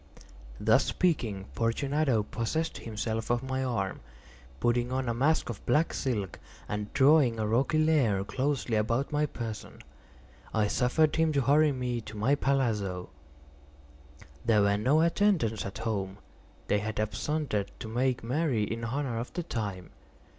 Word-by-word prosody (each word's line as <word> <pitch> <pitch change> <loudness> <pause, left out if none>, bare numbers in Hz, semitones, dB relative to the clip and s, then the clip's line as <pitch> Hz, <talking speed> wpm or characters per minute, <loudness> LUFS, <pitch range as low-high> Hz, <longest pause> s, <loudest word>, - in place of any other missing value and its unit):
Thus - - +4
speaking, 115 - 0
Fortunato 130 +1 +1
possessed 115 +10 -2
himself 110 0 -3
of 120 +1 +1
my 130 0 -2
arm. 110 -7 -2 0.6
Putting 120 - +1
on 130 0 -1
a 120 - +1
mask 145 +7 +2
of 115 -4 -6
black 155 +3 +2
silk, 105 -9 -2 0.3
and 105 0 -4
drawing 135 -4 +5
a 110 - 0
roquelaire 130 -2 +2
closely 130 0 -1
about 115 +6 0
my 150 0 +1
person, 115 -5 -7 0.7
I 110 -1 +3
suffered 150 +8 +2
him 160 -1 +3
to 140 - +2
hurry 145 +4 +4
me 125 -3 -2
to 110 0 -9
my 115 +7 +2
palazzo. 110 -10 0 1.3
There 105 -3 +4
were 100 0 +3
no 130 +10 +3
attendants 165 - +2
at 95 - -7
home; 100 -4 -3 0.5
they 105 - +1
had 105 +1 -4
absconded 110 0 -1
to 115 - -7
make 125 +2 0
merry 130 -2 0
in 115 +2 -3
honor 125 -1 -2
of 120 - -5
the 175 - -3
time. 100 - -4
120 Hz, 145 wpm, -29 LUFS, 110-140 Hz, 1.3 s, drawing